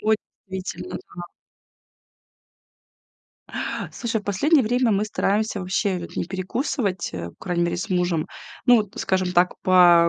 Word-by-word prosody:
Ой, 220 0 +3 0.3
действительно, 190 - -5 0.2
да. 175 - -6 2.7
Слушай, 230 -3 -2
в - - -24
последнее 275 - +3
время, 245 +1 +2
мы 200 +1 +2
стараемся 215 0 0
вообще, 185 +1 0
вот, 170 - -8
не - - 0
перекусывать, 190 - -2
э, 85 -1 -4
по - - -14
крайней 175 -2 0
мере 175 - 0
с 195 +4 -4
мужем. 175 -2 +1 0.4
Ну 245 -2 +7
вот, 210 -3 0
скажем 185 -1 0
так, 180 0 +4
по 175 -2 +7
190 Hz, 145 wpm, -24 LUFS, 180-220 Hz, 2.7 s, Ну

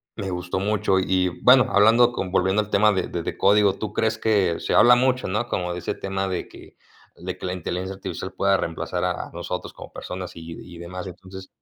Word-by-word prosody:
me 100 -3 -4
gustó 90 0 -3
mucho. 100 -1 +1
Y 95 0 +1 0.2
bueno, 130 +1 +7
hablando 115 +4 +5
con 95 -5 -4
volviendo 95 +2 +2
al 105 - -7
tema 105 +1 +4
de 95 -2 -2
de 85 -1 -4
de - - -5
código, 100 0 +4
¿tú 105 +1 -5
crees 110 +1 0
que 100 -7 +1
se - - -2
habla 120 0 +7
mucho, 130 +1 +1
no? 110 +5 -2
Como 90 -1 -2
de 90 - -5
ese - - -4
tema 95 0 -3
de 90 - -3
que - - -15 0.4
de 90 +1 -6
que 95 - -8
la 90 - -2
inteligencia 90 +2 -4
artificial 95 -1 -6
pueda 100 0 +2
reemplazar 85 -3 -3
a - - -2
nosotros - - -5
como - - -11
personas 90 -1 -7
y - - -8 0.2
y 85 -1 -12
demás, 90 +2 -7
entonces 95 +1 -10
95 Hz, 215 wpm, -23 LUFS, 90-105 Hz, 0.4 s, bueno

